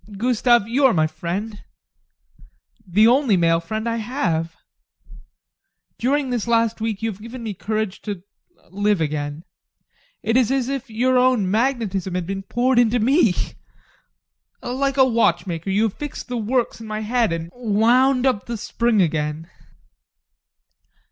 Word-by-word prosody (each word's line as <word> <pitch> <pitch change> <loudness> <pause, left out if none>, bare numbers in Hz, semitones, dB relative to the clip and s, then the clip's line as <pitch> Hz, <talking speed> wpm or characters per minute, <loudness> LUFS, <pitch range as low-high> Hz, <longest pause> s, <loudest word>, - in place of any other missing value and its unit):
Gustav, 240 -1 +2
you 265 +4 +2
are 240 - +1
my 155 -1 +3
friend. 175 +7 -5 1.2
The 205 +5 +4
only 245 -4 +3
male 165 -1 +3
friend 215 +7 -4
I 230 0 -1
have. 175 - -2 1.4
During 270 +2 0
this 240 -2 -2
last 230 -1 +1
week 220 -1 -3
you 225 - 0
have 200 0 -12
given 235 +2 -8
me 220 -2 -4
courage 215 0 -3
to 200 -4 -6 0.5
live 205 0 +1
again. 150 0 -3 0.8
It 225 +2 +2
is 250 -4 +3
as 265 -2 0
if 275 -2 -4
your 250 +3 +2
own 250 -7 +2
magnetism 215 -6 -1
had 180 -1 -2
been 195 +2 -4
poured 240 +5 +1
into 240 0 +3
me. 240 - +3 1.3
Like 275 +2 -1
a 265 - +6
watchmaker, 175 -7 0
you 200 +3 +2
have 220 -3 0
fixed 295 -3 -7
the 250 - -3
works 235 +1 -1
in 225 - -8
my 215 0 -4
head 230 -1 +1
and 165 0 -4
wound 245 +3 +2
up 255 -6 0
the 235 -1 -3
spring 225 -1 +1
again. 155 +1 -2
220 Hz, 150 wpm, -21 LUFS, 190-245 Hz, 1.4 s, a